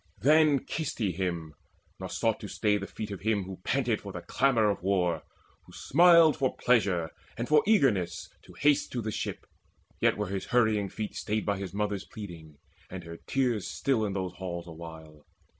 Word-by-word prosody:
Then 150 -1 +4
kissed 160 -2 -3
he 105 -5 0
him, 85 -3 -3 0.5
nor - - -5
sought - - 0
to - - -7
stay 105 -1 +1
the 100 - -6
feet 105 -1 -6
Of 100 - -6
him 105 -1 +1
who 95 0 -8
panted 125 -5 0
for 100 - -7
the 90 - -6
clamour 115 +4 +2
of 100 - -5
war, 90 -4 +1 0.5
Who - - -16
smiled 170 0 +6
for 130 -2 0
pleasure 95 -9 +2 0.3
and 120 +2 -3
for 150 -1 +5
eagerness 105 - +2 0.2
To - - -14
haste 145 0 +2
to 120 -2 -2
the 110 - -2
ship. - - -4 0.5
Yet - - +3
were - - -1
his 95 -1 -3
hurrying 110 -5 +2
feet 105 +2 -5
Stayed 105 0 -2
by 100 -2 0
his 95 -3 -5
mother's 105 -1 -2
pleading 85 -7 -10 0.3
and 95 -1 -7
her 85 0 -9
tears 125 -7 0
Still 130 -5 0
in 100 -2 -1
those 95 -2 -3
halls 85 -2 -5
awhile. 80 -2 -11
100 Hz, 190 wpm, -29 LUFS, 90-125 Hz, 0.5 s, smiled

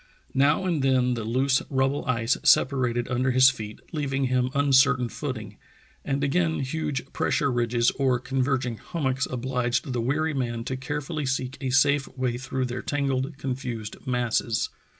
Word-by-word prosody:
Now 140 +7 +3
and 170 -6 0
then 130 -2 +2
the 115 -2 -3
loose 130 +4 +2
rubble 135 +1 +1
ice 115 -1 +1
separated 125 -3 +3
under 125 +1 0
his 130 +1 +6
feet, 110 -4 -8
leaving 140 -3 -1
him 130 -1 +1
uncertain 140 -2 +4
footing, 110 -9 -6 0.5
and 140 0 -1
again 160 +3 +1
huge 140 0 -3
pressure 140 -3 +1
ridges 120 -1 +2
or 130 -2 +1
converging 130 -2 -1
hummocks 135 -4 -2
obliged 125 0 -1
the 120 - -1
weary 155 +6 0
man 120 -4 -2
to 130 - -3
carefully 145 +2 -4
seek 130 0 -2
a 135 - -1
safe 135 +2 +3
way 125 -2 -1
through 130 0 -2
their 125 +1 -4
tangled, 135 0 -1
confused 125 -5 -4
masses. 120 -2 0
130 Hz, 150 wpm, -26 LUFS, 125-140 Hz, 0.5 s, his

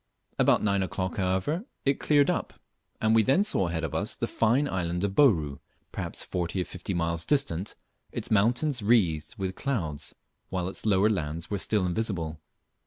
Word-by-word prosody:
About - - +4
nine 100 -2 +2
o'clock, 95 -1 -3
however, 95 - 0 0.2
it 140 0 +2
cleared 145 +2 +4
up, 175 - -3 0.4
and 110 0 +2
we 115 - +6
then 135 - +3
saw 95 - +1
ahead 85 -1 -2
of - - -3
us - - -1
the - - -1
fine 120 +6 +2
island 90 -4 -2
of 100 -1 0
Bouru, 80 - +3 0.3
perhaps - - -2
forty 90 +1 -2
or 90 - 0
fifty 90 +1 -5
miles 85 -1 0
distant, 105 - 0 0.4
its - - -5
mountains 120 +6 +2
wreathed 100 -3 +2
with 95 -2 -2
clouds, 80 - -3 0.3
while 90 -1 -2
its 95 - -5
lower 100 0 +4
lands 80 -5 -2
were 100 - -1
still 105 -2 +1
invisible. 85 -5 -2
95 Hz, 175 wpm, -28 LUFS, 85-115 Hz, 0.4 s, we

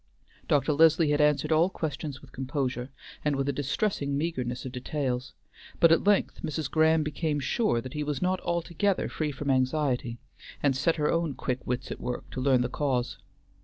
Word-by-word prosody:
Dr. 145 +1 +2
Leslie 160 0 +5
had 145 0 +3
answered 150 +1 +2
all 160 +3 +4
questions 150 -5 -4
with - - -16
composure, 130 -1 -3 0.3
and 150 -1 +1
with 135 0 -1
a 140 - +1
distressing 140 +1 -1
meagreness 130 -6 -2
of 130 - -5
details; 130 0 -3 0.4
but 165 - +6
at 165 - +4
length 205 -1 +2
Mrs. 155 -2 -3
Graham 160 0 +4
became 150 0 -1
sure 135 - +1
that 130 +1 -8
he 150 - -2
was 145 -1 -2
not 185 0 +1
altogether 170 +3 0
free 155 -2 -2
from 140 0 -2
anxiety, 130 -2 0 0.5
and 140 -2 +3
set 145 +5 +2
her 150 -1 +1
own 165 -4 0
quick 125 0 -2
wits 125 +1 -2
at - - -6
work 125 - -4
to 130 - -4
learn 130 -2 +4
the 125 - +1
cause. 125 -6 -1
145 Hz, 185 wpm, -28 LUFS, 130-160 Hz, 0.5 s, but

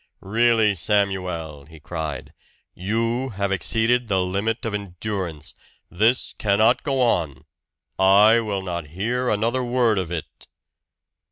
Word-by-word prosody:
"Really, 110 +1 +3
Samuel!" 90 -7 -2
he 80 0 -14
cried. 80 -2 -6 0.4
"You 115 +7 -1
have 100 -1 -1
exceeded 115 +6 +1
the 95 -3 +1
limit 100 +6 -2
of 115 - -3
endurance. 95 -5 -5 0.4
This 110 +7 +1
cannot 110 +4 +3
go 135 -2 -1
on! 80 - -1 0.5
I 100 +4 +6
will 100 -4 -3
not 85 -4 -4
hear 125 +5 -1
another 115 +5 0
word 120 -4 +2
of 90 -3 -4
it!" 85 -3 -7
100 Hz, 120 wpm, -23 LUFS, 90-115 Hz, 0.5 s, I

